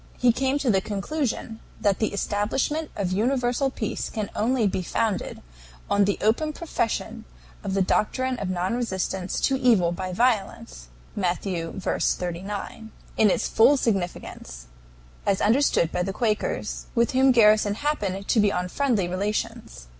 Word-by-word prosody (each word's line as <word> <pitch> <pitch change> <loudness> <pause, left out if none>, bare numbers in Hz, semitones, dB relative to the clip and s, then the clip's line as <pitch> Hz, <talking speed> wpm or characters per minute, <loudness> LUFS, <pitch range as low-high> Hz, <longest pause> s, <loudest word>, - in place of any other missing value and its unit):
He 250 -1 +4
came 265 +3 0
to 275 -5 +1
the 190 -2 +2
conclusion 225 +2 -3 0.2
that 200 -2 +1
the 220 - 0
establishment 220 +10 -1
of 190 -3 -2
universal 245 +5 +1
peace 220 -5 -4
can 215 -2 -4
only 230 +2 +1
be 190 -1 0
founded 205 +3 -2 0.5
on 200 0 +4
the 200 - 0
open 300 +9 +1
profession 295 -9 -3 0.4
of 190 - -2
the 195 - +3
doctrine 255 +6 0
of 195 - -3
non 185 +2 -1
resistance 190 -5 -2
to 265 -1 +1
evil 220 -10 +4
by 185 +1 -4
violence 195 - -1 0.3
(Matt. 180 -3 -1
v. 170 -4 -3
39), 195 +5 -3 0.2
in 215 - +4
its - - +1
full 265 +6 +5
significance, 175 - -3 0.6
as 195 -1 +1
understood 220 - +3
by - - -1
the 190 +2 -2
Quakers, 215 -1 -2
with 235 0 +2
whom 265 +1 +4
Garrison 215 -3 +5
happened 205 -9 -2
to 230 - +3
be 205 -1 +4
on 180 0 -2
friendly 235 -7 +1
relations. 210 - -3
210 Hz, 150 wpm, -25 LUFS, 190-245 Hz, 0.6 s, full